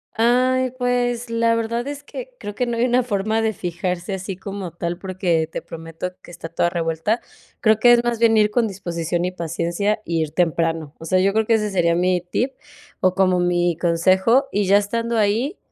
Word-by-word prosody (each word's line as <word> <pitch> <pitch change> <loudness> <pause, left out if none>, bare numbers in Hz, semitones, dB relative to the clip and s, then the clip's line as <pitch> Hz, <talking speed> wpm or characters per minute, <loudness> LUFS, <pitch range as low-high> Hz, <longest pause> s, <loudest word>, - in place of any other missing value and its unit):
Ay, 255 +2 +2
pues, 245 -1 0
la 230 0 +2
verdad 230 +1 -2
es 285 0 -6
que - - -8
creo 205 - -7
que 250 - 0
no 235 -1 -2
hay 235 - +2
una 250 0 +2
forma 215 -1 0
de 220 0 0
fijarse 180 +1 -3
así 190 0 -5
como 195 -1 -6
tal, 170 +1 -4
porque 180 -4 -1
te - - -4
prometo 165 +2 -7
que - - -13
está 170 -1 -8
toda 170 +1 +1
revuelta. 165 +6 -1 0.4
Creo 220 -1 +3
que 240 +2 +6
es 240 0 +4
más 240 -1 0
bien 230 -1 +4
ir 210 -1 +4
con 230 +1 +1
disposición 175 -3 -3
y 180 - -1
paciencia, 170 +5 -2
y 165 -1 0
ir 155 -2 -2
temprano. 165 -2 0
O 165 - -9
sea, 185 +3 +2
yo 195 +1 +2
creo 220 +1 +2
que 230 - +2
ese 210 -1 0
sería 170 -3 +2
mi 180 +1 +1
tip 235 +9 -2 0.5
o 185 -1 +2
como 185 -1 +2
mi 175 -1 +1
consejo, 185 +9 +3
y 205 0 +1
ya 195 +2 +5
estando 230 +3 -1
ahí, 220 - +1
195 Hz, 205 wpm, -21 LUFS, 175-230 Hz, 0.5 s, que